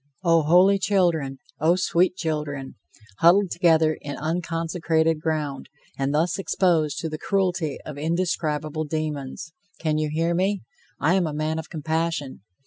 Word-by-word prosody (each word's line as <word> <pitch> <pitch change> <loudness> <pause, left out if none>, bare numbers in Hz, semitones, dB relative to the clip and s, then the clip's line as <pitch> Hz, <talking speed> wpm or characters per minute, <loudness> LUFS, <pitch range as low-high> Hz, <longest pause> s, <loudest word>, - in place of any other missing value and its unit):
O 165 -2 +4
holy 180 +6 +5
children! 170 -9 +1 0.2
O 165 +3 +4
sweet 180 0 +2
children! 150 -5 -3 0.5
huddled 180 +2 +5
together 160 -2 +3
in 145 0 -5
unconsecrated 165 -1 0
ground, 150 -4 -2 0.3
and 135 0 -1
thus 160 +5 +1
exposed 165 -6 +1
to 165 - -2
the 155 -1 -5
cruelty 180 -6 0
of 145 -2 -7
indescribable 155 -2 -1
demons! 155 0 -4 0.2
Can 155 -1 0
you 155 -1 -1
hear 165 +2 0
me? 190 +3 0 0.4
I - - +3
am 185 -3 +2
a 150 - -4
man 155 +1 -1
of 160 - -8
compassion. 160 -2 -2
160 Hz, 140 wpm, -24 LUFS, 155-175 Hz, 0.5 s, holy